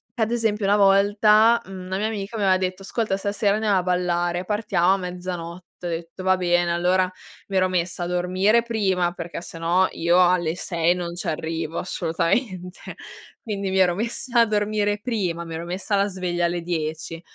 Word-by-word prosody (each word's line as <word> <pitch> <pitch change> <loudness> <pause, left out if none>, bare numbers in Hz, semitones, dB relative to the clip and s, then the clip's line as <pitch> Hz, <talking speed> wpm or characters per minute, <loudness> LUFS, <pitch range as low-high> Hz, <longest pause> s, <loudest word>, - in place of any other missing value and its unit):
ad 225 -2 0
esempio 220 -3 0
una 200 +1 +4
volta, 210 +3 +5
mhmm, 190 -1 -8
una 190 +1 -2
mia 215 - 0
amica 215 0 -5
mi 210 - -1
aveva 190 -1 +4
detto: 185 0 -3
"Ascolta 215 0 -1
stasera 200 +1 0
andiamo 210 -2 +1
a 185 - 0
ballare 175 -1 0
partiamo 200 -3 +1
a - - +1
mezzanotte." 180 -1 -6 0.2
Ho - - -2
detto: 170 +2 -6
"Va 185 0 +3
bene." 175 -1 +1
Allora 180 +2 +2 0.4
mi 195 - -1
ero 185 0 +3
messa 180 -1 -1
a - - -2
dormire 185 +5 +2
prima 190 -7 0
perché 170 -2 -6
se 170 - -10
no 175 +3 +3
io 170 +2 +2
alle 175 -3 +1
6 170 -1 +1
non 175 -1 -5
ci 175 +1 -5
arrivo 160 0 -3
assolutamente 180 +2 -2 0.6
quindi 200 -3 -3
mi 190 - +1
ero 180 -2 +4
messa 235 +3 -1
a - - +5
dormire 210 -1 0
prima 195 -8 -2
mi 165 -1 -6
ero 165 +1 -5
messa 185 +4 -2
la 200 0 +3
sveglia 180 -3 -2
alle 175 0 -1
10 165 -1 -4
185 Hz, 185 wpm, -23 LUFS, 175-205 Hz, 0.6 s, volta